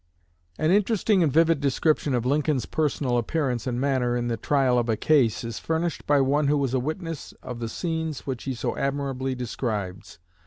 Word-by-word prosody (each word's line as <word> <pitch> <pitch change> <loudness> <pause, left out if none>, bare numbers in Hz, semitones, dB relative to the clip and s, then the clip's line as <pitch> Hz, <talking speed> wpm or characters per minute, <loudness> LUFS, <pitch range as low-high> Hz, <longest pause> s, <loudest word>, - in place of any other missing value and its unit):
An 155 +2 +2
interesting 210 0 +3
and 155 -4 +3
vivid 165 +1 +4
description 145 0 +1
of 120 -1 -1
Lincoln's 145 -2 +1
personal 140 -5 0
appearance 125 -2 -1
and 120 -1 -1
manner 130 -3 +1
in 120 0 -2
the 115 - 0
trial 130 +1 +2
of 120 -1 -1
a 110 - +1
case 130 -6 +2
is 115 -2 -5
furnished 165 0 -2
by 145 -1 +4
one 140 +2 +2
who 150 +1 +3
was 135 -3 0
a 130 - +2
witness 160 +3 -5
of 125 -2 -6
the 115 -1 -3
scenes 160 -1 -3
which 130 -3 -4
he 135 -2 -2
so - - -2
admirably 135 -1 -2
describes. 105 -8 -4
135 Hz, 190 wpm, -25 LUFS, 120-155 Hz, -, vivid